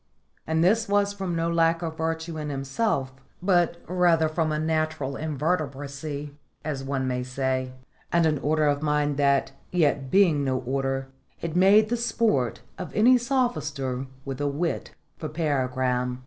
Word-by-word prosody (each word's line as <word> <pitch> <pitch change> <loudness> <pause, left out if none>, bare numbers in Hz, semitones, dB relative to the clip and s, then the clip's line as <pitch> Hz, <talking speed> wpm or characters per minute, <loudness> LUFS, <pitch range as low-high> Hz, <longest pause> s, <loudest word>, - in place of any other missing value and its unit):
And 160 +1 +2
this 220 +4 +3
was 200 0 +2
from 190 -4 -3
no 165 0 0
lack 165 0 +2
of 160 -1 -3
virtue 160 0 -2
in 150 -1 -4
himself, 135 +1 -1 0.3
but 175 -2 +2
rather 175 -2 +3
from 155 0 0
a 150 - 0
natural 155 -3 -1
invertebracy, 145 -1 -3 0.3
as 140 -4 -3
one 135 -1 -2
may 125 -1 -1
say, 130 0 -2 0.4
and 170 -1 +3
an 155 -3 +2
order 155 +2 +1
of 145 -1 +1
mind 150 -1 +1
that, 140 -1 +2 0.2
yet 145 -6 +1
being 170 -6 +4
no 130 -1 0
order, 135 +1 -1 0.3
is 165 -2 -3
made 200 +4 +6
the 240 - +1
sport 215 - 0 0.2
of 180 - -5
any 245 +4 +6
sophister 150 - -1 0.2
with 135 0 -5
a 145 - +1
wit 155 +4 -2 0.2
for 155 - -4
paragram. 130 -5 0
155 Hz, 155 wpm, -26 LUFS, 135-170 Hz, 0.4 s, made